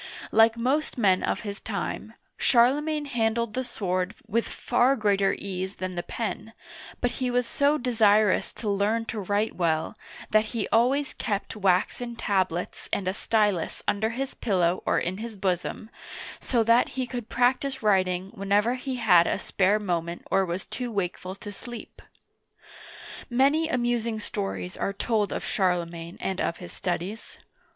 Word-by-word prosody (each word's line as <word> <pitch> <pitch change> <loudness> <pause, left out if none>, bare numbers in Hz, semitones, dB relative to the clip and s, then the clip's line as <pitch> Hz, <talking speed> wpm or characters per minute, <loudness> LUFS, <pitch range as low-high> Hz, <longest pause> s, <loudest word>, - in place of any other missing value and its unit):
Like 225 +1 +5
most 265 +7 0
men 190 -5 +3
of - - -1
his 205 -2 -5
time, - - -4 0.2
Charlemagne 290 +5 +3
handled 235 -3 0
the 255 - -1
sword 185 -4 -2
with 225 +1 0
far 250 +2 +2
greater 200 -4 +2
ease 190 0 -4
than 185 0 -4
the 175 - -2
pen, 225 +3 -4 0.5
but 245 - +1
he 255 - +1
was 245 0 +1
so 285 +5 +2
desirous 215 -5 +3
to 220 - -6
learn 205 +3 +1
to 225 - -4
write 205 +2 0
well, 160 -3 0 0.4
that 215 0 +4
he 215 - -1
always 265 +5 +2
kept 205 -1 -3
waxen 210 +5 +1
tablets 185 -5 -1
and 190 - -1
a 185 - +1
stylus 205 -5 0
under 220 +2 +1
his 260 +4 -3
pillow 180 -5 +1
or - - +3
in 185 +3 -2
his 225 0 -6
bosom, 190 +3 -2 0.5
so 235 -3 +1
that 230 +2 +4
he 260 - 0
could 245 -2 -6
practice 255 +2 +1
writing 190 -2 +2
whenever 205 +4 +2
he 260 +1 -4
had 175 -8 +5
a - - +1
spare 195 +2 +2
moment 175 -4 -3
or 195 -1 +3
was 175 +2 -3
too 245 -2 -4
wakeful 185 -2 -3
to 205 +1 -8
sleep. 240 +3 -9 1.3
Many 280 +6 +3
amusing 240 -4 0
stories 95 - -4
are 195 - -2
told 210 0 0
of - - -3
Charlemagne 175 -3 -1
and 190 -1 -2
of 170 - -1
his 175 - -10
studies. 185 +5 -4
215 Hz, 155 wpm, -26 LUFS, 185-240 Hz, 1.3 s, Like